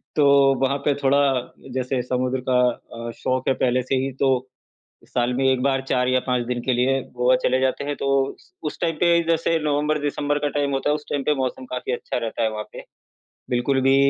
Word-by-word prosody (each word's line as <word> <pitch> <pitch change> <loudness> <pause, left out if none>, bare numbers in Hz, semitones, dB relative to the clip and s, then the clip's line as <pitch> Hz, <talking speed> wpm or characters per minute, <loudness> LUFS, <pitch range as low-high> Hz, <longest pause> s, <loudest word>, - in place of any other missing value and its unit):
तो, 150 -2 +4 0.3
वहाँ 135 +1 +2
पे 145 - +4
थोड़ा 135 +1 +4 0.6
जैसे 130 0 -1
समुद्र 130 +1 -1
का 125 -1 +4 0.5
अ, - - -4
शौक 130 0 -1
है 135 - +4
पहले 125 0 +2
से 130 +2 -1
ही 135 - -3
तो, 130 -2 +2 0.6
साल 120 0 0
में 135 +2 0
1 130 -1 +2
बार 135 -1 +1
4 125 0 +1
या 130 0 +3
5 125 -2 0
दिन 125 0 -2
के 130 - 0
लिए 130 +2 +2 0.2
गोवा 125 +1 +4
चले 130 +1 +2
जाते 130 +1 0
हैं, 145 0 -3
तो 140 - -2 0.2
उस - - -12
उस 150 - -4
टाइम 165 -2 0
पे 170 -1 +5
जैसे 165 0 +2
नवंबर-दिसंबर 145 0 0
का - - +2
टाइम 140 -1 0
होता 135 +2 0
है, - - +3
उस 150 - -11
टाइम 145 - -1
पे 150 - +2
मौसम 130 -1 -3
काफ़ी 125 0 -3
अच्छा 120 - -3
रहता 115 -1 -3
है 110 - +2
वहाँ 105 0 -5
पे। - - -9 0.7
बिल्कुल 125 +2 +1
भी 135 +1 +4
130 Hz, 215 wpm, -23 LUFS, 125-145 Hz, 0.7 s, पे